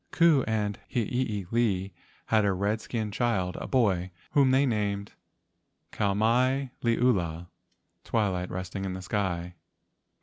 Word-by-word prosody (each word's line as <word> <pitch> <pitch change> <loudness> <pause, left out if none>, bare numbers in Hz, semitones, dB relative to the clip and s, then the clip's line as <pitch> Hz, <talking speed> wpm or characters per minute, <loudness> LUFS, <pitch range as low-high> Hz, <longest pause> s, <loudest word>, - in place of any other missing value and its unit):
Ku 165 -6 +4
and 105 -2 -1
Hiilei 110 -4 0 0.3
had 110 -1 +3
a - - +2
red¬ 100 +3 0
skin 110 -2 -3
child, 100 -5 0
a - - -5
boy, 95 -8 +2 0.2
whom 140 -2 +4
they 135 +2 +4
named 105 -4 -1 0.8
Kau 100 -1 0
mai 125 +5 +2
liula 95 -9 +1 0.5
(twilight 95 -5 0
resting 95 +2 -5
in 95 -1 -3
the 95 0 -6
sky). 90 -3 -2
105 Hz, 125 wpm, -28 LUFS, 95-120 Hz, 0.8 s, Ku